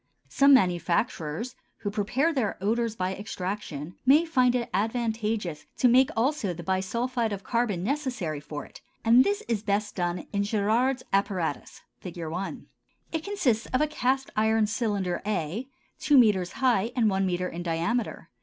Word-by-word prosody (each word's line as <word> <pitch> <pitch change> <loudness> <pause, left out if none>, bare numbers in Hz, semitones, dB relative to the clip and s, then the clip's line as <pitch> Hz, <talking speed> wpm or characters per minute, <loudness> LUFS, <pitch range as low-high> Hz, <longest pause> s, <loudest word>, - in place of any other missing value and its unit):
Some 275 - +5
manufacturers 180 - 0 0.3
who 205 - -2
prepare 245 +10 0
their 245 -8 -1
odors 225 +3 0
by 185 -2 -1
extraction, 185 -6 -5
may 290 +6 +5
find 255 -6 +3
it 240 -2 -1
advantageous 220 -5 -1
to 255 - +4
make 255 +3 +5
also 230 - 0
the 175 - -8
bisulphide 225 +6 -1
of 200 -1 -5
carbon 230 -7 0
necessary 245 - -2
for 145 0 -7
it, - - -15 0.2
and 235 +3 +7
this 410 +5 -1
is 225 -4 0
best 210 0 -1
done 175 -1 -2
in 200 - +1
Gérard's 225 +5 +1
apparatus 185 -6 -1 0.2
(Fig. 180 -2 -8
1). 170 +3 -5 0.5
It 320 -1 -2
consists 260 - 0
of 255 - 0
a 305 - +4
cast 270 -3 -1
iron 220 0 +3
cylinder 205 -5 -1
a, 210 - -2 0.3
two 290 - +4
metres 200 -7 +4
high 240 -4 +1
and 235 -4 +3
one 195 -1 +1
metre 180 0 -1
in 175 -1 -6
diameter. 175 +8 -2
215 Hz, 155 wpm, -27 LUFS, 185-250 Hz, 0.5 s, and